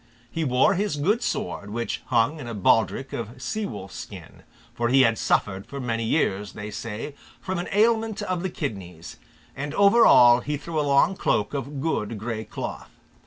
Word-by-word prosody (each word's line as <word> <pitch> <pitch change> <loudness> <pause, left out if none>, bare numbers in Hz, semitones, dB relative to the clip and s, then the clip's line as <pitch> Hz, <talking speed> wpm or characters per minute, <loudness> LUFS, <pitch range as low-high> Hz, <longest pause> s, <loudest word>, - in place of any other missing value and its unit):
He 165 - -2
wore 130 +4 +3
his 200 -3 -1
good 200 +11 +1
sword, 100 - -3
which 115 +2 -3
hung 125 +6 +2
in 130 - -7
a 115 - -5
baldric 110 +5 +1
of 115 +2 -6
sea 205 - -3
wolf's 100 -3 -8
skin, - - -10 0.3
for 120 0 -1
he 135 +2 +5
had 115 -2 +2
suffered 95 -1 0
for 140 - -7
many 115 -3 -2
years, 105 -6 0
they 105 +1 -7
say, 115 +7 -6 0.3
from 190 -2 -3
an 175 - -4
ailment 220 0 +2
of 185 -3 -2
the 190 - -2
kidneys; 95 - -6 0.4
and 145 +2 -5
over 200 +4 +6
all 120 - +7
he 150 +4 -3
threw 160 +2 -4
a - - +3
long 140 +6 +3
cloak 105 - 0
of 140 0 -4
good 115 -8 -2
grey 110 +1 -4
cloth. - - -6
130 Hz, 185 wpm, -25 LUFS, 110-165 Hz, 0.4 s, all